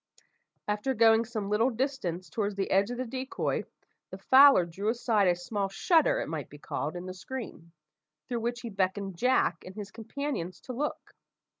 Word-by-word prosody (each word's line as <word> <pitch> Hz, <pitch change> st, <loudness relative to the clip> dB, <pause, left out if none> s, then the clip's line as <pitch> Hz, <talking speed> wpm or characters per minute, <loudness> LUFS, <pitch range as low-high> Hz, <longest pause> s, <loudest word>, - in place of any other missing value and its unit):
After 210 Hz, +6 st, -1 dB
going 225 Hz, +1 st, +5 dB
some 215 Hz, -3 st, -4 dB
little 225 Hz, +4 st, +3 dB
distance 230 Hz, -, -2 dB
towards 205 Hz, -2 st, -2 dB
the 195 Hz, -1 st, -2 dB
edge 195 Hz, +2 st, +3 dB
of 245 Hz, -, -4 dB
the 255 Hz, -, -2 dB
decoy, 260 Hz, +2 st, -3 dB, 0.4 s
the -, -, -8 dB
fowler 270 Hz, -8 st, +7 dB
drew 195 Hz, +5 st, -3 dB
aside 225 Hz, -4 st, +2 dB
a 175 Hz, -, +4 dB
small 195 Hz, +3 st, -3 dB
shutter, 345 Hz, -, +3 dB
it -, -, -4 dB
might -, -, -5 dB
be -, -, -12 dB
called, -, -, -4 dB
in 175 Hz, +1 st, -6 dB
the 185 Hz, -, -6 dB
screen, 185 Hz, -4 st, -8 dB, 0.6 s
through 240 Hz, -2 st, -2 dB
which 240 Hz, +1 st, -3 dB
he 235 Hz, -, -6 dB
beckoned 195 Hz, 0 st, -1 dB
Jack 250 Hz, -9 st, +2 dB
and 185 Hz, -, -10 dB
his 210 Hz, -2 st, -7 dB
companions 225 Hz, -, -4 dB
to 255 Hz, -, -7 dB
look. 290 Hz, +5 st, -4 dB
220 Hz, 180 wpm, -29 LUFS, 195-255 Hz, 0.6 s, fowler